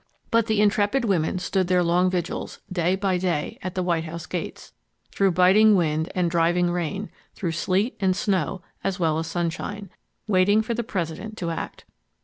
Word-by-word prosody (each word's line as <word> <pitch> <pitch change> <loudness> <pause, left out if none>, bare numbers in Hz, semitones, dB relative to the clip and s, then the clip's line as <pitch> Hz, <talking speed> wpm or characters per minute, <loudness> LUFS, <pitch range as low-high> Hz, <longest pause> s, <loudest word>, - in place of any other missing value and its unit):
But 230 -1 +3
the 220 -2 +2
intrepid 210 +4 +2
women 180 -4 +1
stood 185 0 0
their 180 -1 +3
long 175 +2 +3
vigils, 180 -1 -3
day 180 0 +1
by 190 -2 0
day, 175 -5 -2
at 185 0 -5
the 185 - 0
White 170 -2 0
House 170 +1 -6
gates, - - -6 0.4
through 195 -2 +2
biting 195 +5 +6
wind 160 -2 0
and 175 -2 +1
driving 175 +1 +2
rain, 180 +4 -3 0.2
through 175 -4 -2
sleet 190 +7 0
and 190 -2 +2
snow 190 -2 -1 0.2
as 195 0 -2
well 160 -2 +1
as 165 - -3
sunshine, 175 +4 -3 0.3
waiting 205 +1 +3
for 235 - -2
the 235 +1 -2
President 205 +1 -4
to 170 -4 -2
act. 165 - -6
185 Hz, 175 wpm, -24 LUFS, 170-200 Hz, 0.4 s, biting